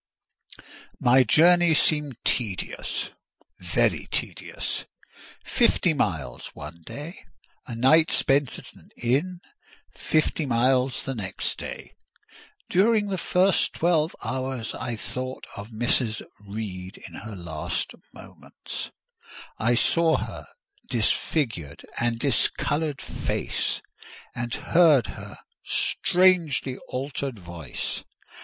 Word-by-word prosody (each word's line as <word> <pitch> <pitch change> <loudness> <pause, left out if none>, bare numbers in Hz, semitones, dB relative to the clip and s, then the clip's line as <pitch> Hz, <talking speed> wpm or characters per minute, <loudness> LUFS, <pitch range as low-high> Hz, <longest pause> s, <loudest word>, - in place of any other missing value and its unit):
My 130 +2 +6
journey 170 +6 +5
seemed 150 -4 +2
tedious—very 105 -7 -2
tedious: - - -3 0.6
fifty - - +3
miles - - -2
one 75 +3 -9
day, 155 +6 -8 0.4
a 120 - -5
night 155 +7 +5
spent 135 -1 +2
at - - -12
an - - -19
inn; 150 +10 0 0.5
fifty 155 -1 +1
miles 125 +1 +2
the 135 - -2
next 95 -6 -3
day. - - -7 0.8
During 205 +2 +3
the 190 -2 -1
first 185 +2 +2
twelve 165 -2 +2
hours 130 -3 -3
I 120 -2 -3
thought 130 +3 -5
of 100 +2 -7
Mrs. 115 -1 +1 0.2
Reed 100 -3 -6
in - - -14
her 110 -2 -7
last 85 -4 -3 0.2
moments; - - -7 0.7
I 120 +2 +3
saw 165 +7 +3
her - - -6 0.4
disfigured 115 - 0
and 120 0 +1
discoloured 145 +4 +1
face, - - -2 0.5
and 120 0 -4
heard 155 -7 +4
her - - -10 0.3
strangely 170 -8 +2
altered 135 -1 -3
voice. 85 -7 -5
130 Hz, 100 wpm, -26 LUFS, 115-160 Hz, 0.8 s, My